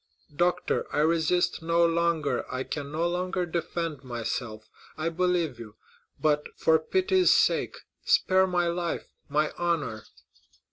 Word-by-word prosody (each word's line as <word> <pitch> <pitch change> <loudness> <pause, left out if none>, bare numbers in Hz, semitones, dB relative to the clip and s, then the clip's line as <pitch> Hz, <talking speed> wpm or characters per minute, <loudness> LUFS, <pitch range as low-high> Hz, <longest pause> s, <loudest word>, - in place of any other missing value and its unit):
"Doctor, 180 +2 0
I - - +1
resist 165 +3 +1
no 170 +1 +3
longer—I 165 -6 0
can 145 0 -5
no 165 +3 0
longer 180 +1 -1
defend 165 -3 -3
myself—I 120 +4 -5
believe 170 -6 0
you; 110 -2 -10 0.4
but, 150 -1 +1
for 160 0 +4
pity's 370 - +2
sake, - - +3 0.3
spare 190 0 +3
my 175 -1 +1
life, 170 0 -2 0.2
my 150 +2 +1
honor!" 155 -11 -1
165 Hz, 120 wpm, -27 LUFS, 145-175 Hz, 0.4 s, for